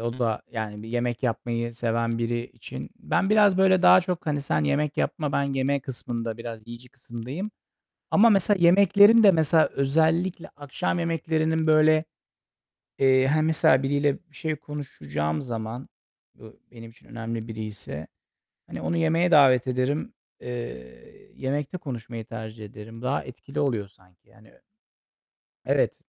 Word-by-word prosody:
o 120 +2 -4
da, 115 -3 -1
yani, 105 -2 -5
bir 110 - -10
yemek 120 +1 -2
yapmayı 120 0 -2
seven 115 -1 -1
biri 120 +1 -2
için - - -10
ben 195 - 0
biraz, 205 -3 +5
böyle, 190 -1 +4
daha 185 - +7
çok, 180 -2 -4
hani, 145 -2 0
"Sen 80 - 0
yemek 150 - 0
yapma, 150 -2 -1
ben 140 - +1
yeme" 135 +1 0
kısmında, 115 -3 -5
biraz 115 -2 -8
yiyici 120 +1 -11
kısımdayım. 130 - -7 0.6
Ama, 230 +3 +6
mesela, 200 0 +3
yemeklerim 200 +5 +6
de, 205 - +8
mesela, 160 -1 +3
özellikle 160 +6 +1
akşam 145 +5 -3
yemeklerinin, 160 -1 0
böyle, 155 0 +4 1.0
eee, 130 -1 +4
hani, 155 +2 +2
mesela, 150 -4 +3
biriyle 140 +1 +1 0.2
bir 150 - -23
şey 155 -1 -3
konuşacağım 80 - -4
zaman, 115 0 -6 0.5
bu 110 0 -16
benim 115 -1 -12
için 115 - -23
önemli 115 -1 -6
biriyse, 105 -8 -7 0.6
hani, - - -7
onu 170 - -1
yemeğe 165 +2 +2
davet 130 -4 +5
ederim. 130 - -1 0.3
Eee, 65 - -9
yemekte 140 +5 -3
konuşmayı 115 -7 -7
tercih 110 -1 -8
ederim. 110 +2 -11
Daha 130 +3 -1
etkili 130 +2 -8
oluyor 115 -8 0
sanki, 90 -2 -28
yani, 110 0 -21
ö - - -25 1.1
Evet. - - +1
130 Hz, 145 wpm, -25 LUFS, 115-160 Hz, 1.1 s, de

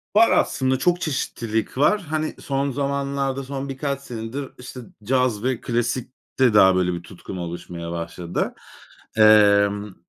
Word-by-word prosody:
Var 225 +2 +6
aslında. 130 0 +2
Çok 175 +2 +1
çeşitlilik 115 -6 -2
var. 200 +9 +3
Hani, 155 -1 -3
son 140 0 -1
zamanlarda, 140 0 -2
son 135 +1 -5
birkaç 140 0 -3
senedir, 125 +2 -6
işte, 125 0 -9 0.2
caz 125 -2 +1
ve 130 -2 -1
klasikte 120 0 -1
daha 95 -2 +6
böyle 90 -1 +1
bir 85 0 -6
tutkum 95 +1 -9
oluşmaya 85 0 -6
başladı. 85 +1 -3 0.6
Emm 105 -1 +5
125 Hz, 130 wpm, -23 LUFS, 100-140 Hz, 0.6 s, Var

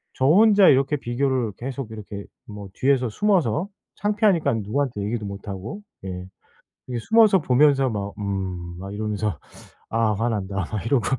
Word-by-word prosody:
저 130 - 0
혼자 200 +5 +6
이렇게 135 +2 +4
비교를 125 -3 -1
계속 130 -2 -5
이렇게 105 -2 -8 0.2
뭐 105 -2 -9
뒤에서 130 +2 +2
숨어서 175 - +1 0.3
창피하니깐 205 - +1
누구한테 120 +1 -2
얘기도 105 +1 -3
못하고. 100 - -6 0.3
예. 90 -1 -6 0.6
이게 125 - -3
숨어서 220 - +5
보면서 135 0 +4
막 100 -3 -4
'음.' 95 -4 -4
막 95 +1 -7
이러면서 105 -3 -2 0.5
'아 115 -1 +1
화난다.' 105 -3 -2 0.2
막 105 -2 -3
이러고 120 -2 +2
115 Hz, 320 characters per minute, -23 LUFS, 100-140 Hz, 0.6 s, 혼자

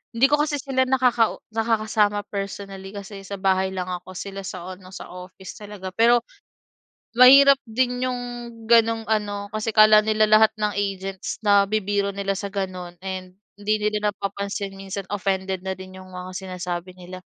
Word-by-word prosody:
hindi 235 +3 +5
ko 295 - +4
kasi 300 -1 0
sila 260 -1 0
nakau 250 -3 +2 0.2
nakakasama 215 -2 +1
personally 195 -1 -5
kasi 200 0 -8
sa 200 +1 -6
bahay 190 0 +1
lang 185 -1 -4
ako. 180 +1 -7
Sila 195 +1 -6
sa 185 -1 -6
ano 185 0 -14
sa 185 - -9
office 180 +1 -10
talaga 205 -3 -8
pero, 235 +1 +4 1.0
mahirap 275 +2 +9
din 250 +2 0
'yong 250 -1 -2 0.5
gano'ng 230 -1 +4
ano 205 -2 -1
kasi 215 +1 -2
akala 215 0 +8
nila 215 0 +3
lahat 215 0 +6
ng 210 -1 0
agents 195 -1 -3
na 200 -1 +5
bibiro 200 -1 0
nila 195 0 -1
sa 200 - -4
gano'n 185 -3 -4
and 185 -1 -6 0.2
hindi 205 +1 0
nila 210 0 0
napapansin 200 +1 -4
minsan 195 0 -5
offended 190 -1 -1
na 190 - -1
din 190 0 -11
'yong 185 0 -12
mga 180 0 -7
sinasabi 180 -1 -5
nila. 185 0 -10
200 Hz, 165 wpm, -23 LUFS, 190-220 Hz, 1.0 s, mahirap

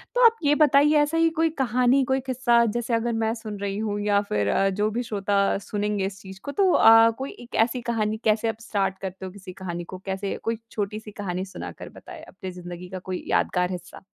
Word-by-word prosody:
तो - - +5
आप 460 0 +7
ये 295 0 +4
बताइए 295 0 +5
ऐसा 300 +3 0
ही 330 0 +4
कोई 325 0 +4
कहानी, 250 +3 +3
कोई 265 +1 +1
किस्सा 240 -2 +3
जैसे 235 +2 -2
अगर 230 +1 +1
मैं 225 0 0
सुन 215 -3 -7
रही 200 0 -3
हूँ 210 -1 -2
या 205 -1 +2
फिर 105 -1 0
अ, 195 0 +2
जो 205 +2 0
भी 240 +3 -2
श्रोता 200 -2 +1
सुनेंगे 205 -1 -2
इस 195 0 -6
चीज़ 190 0 -11
को 285 - -4
तो 380 +2 +3
अ, 225 0 +7
कोई 270 +1 -5
1 240 0 -10
ऐसी 245 +1 -3
कहानी 220 -2 -1
कैसे 220 +1 +2
आप 225 0 -5
स्टार्ट 195 -4 -1
करते 190 0 -6
हो 185 - -6
किसी 185 -2 -11
कहानी 175 -2 -5
को? 185 +2 -9
कैसे 195 +1 -3
कोई 225 0 -1
छोटी-सी 210 +1 -4
कहानी 190 -2 -4
सुनाकर 190 - -8
बताएँ 330 -3 -12
अपने 190 - -8
ज़िंदगी 180 0 -9
का 190 -1 -6
कोई 185 0 -5
यादगार 180 0 +1
हिस्सा। 180 0 -8
210 Hz, 220 wpm, -25 LUFS, 190-240 Hz, -, आप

